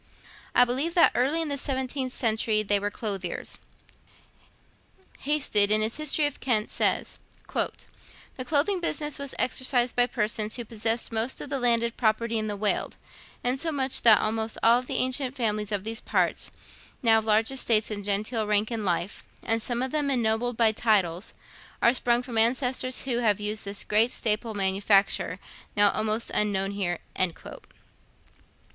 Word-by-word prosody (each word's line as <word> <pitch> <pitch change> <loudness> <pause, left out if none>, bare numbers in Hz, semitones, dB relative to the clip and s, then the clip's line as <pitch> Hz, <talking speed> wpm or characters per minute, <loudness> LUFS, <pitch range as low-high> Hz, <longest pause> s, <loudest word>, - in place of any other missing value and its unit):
I 245 - +7
believe 275 +8 -2
that 345 - +6
early 285 +7 +1
in 315 - -5
the 280 -1 -2
seventeenth 260 -1 -2
century 220 -3 +1
they 205 0 +2
were 205 +1 -2
clothiers. 195 -5 -4 1.6
Hasted, 270 -9 +2
in 215 0 +4
his 220 +1 0
history 305 0 +1
of 290 - -3
Kent, 225 -4 0
says: - - 0 0.3
'The 255 - -6
clothing 315 +7 +1
business 300 -4 -1
was 280 -1 -4
exercised 255 -1 +1
by 245 0 +3
persons 215 -3 -2
who 240 - -4
possessed 225 +1 -3
most 225 +3 -2
of 285 - -7
the 275 - -1
landed 235 -1 +1
property 230 0 0
in 215 - -3
the 205 -1 -4
Weald, 210 0 -1 0.5
insomuch 270 +1 0
that 225 -3 +7
almost 220 +1 -2
all 235 +2 +5
the 255 - -6
ancient 255 0 0
families 215 -4 -1
of 200 -2 -2
these 225 +1 -4
parts, - - -1 0.5
now 225 -2 +5
of 220 - -7
large 220 +2 +2
estates 225 -5 +1
and 205 -1 -5
genteel 210 +2 -1
rank 210 +2 +1
in 225 -2 -3
life, 180 0 -2 0.2
and 225 0 0
some 240 +2 -2
of 260 - -3
them 295 -2 0
ennobled 240 -1 0
by 225 -2 +4
titles, 205 -5 0 0.4
are 235 - +4
sprung 245 -1 +2
from 240 -3 -1
ancestors 255 +2 +1
who 245 -3 -1
have 210 -4 +1
used 210 0 -2
this 200 0 -3
great 220 +3 +2
staple 220 0 -2
manufacture, 195 +1 +1 0.4
now 205 -1 +6
almost 220 +1 -1
unknown 195 -2 0
here.' 185 -4 -2
225 Hz, 160 wpm, -26 LUFS, 210-255 Hz, 1.6 s, I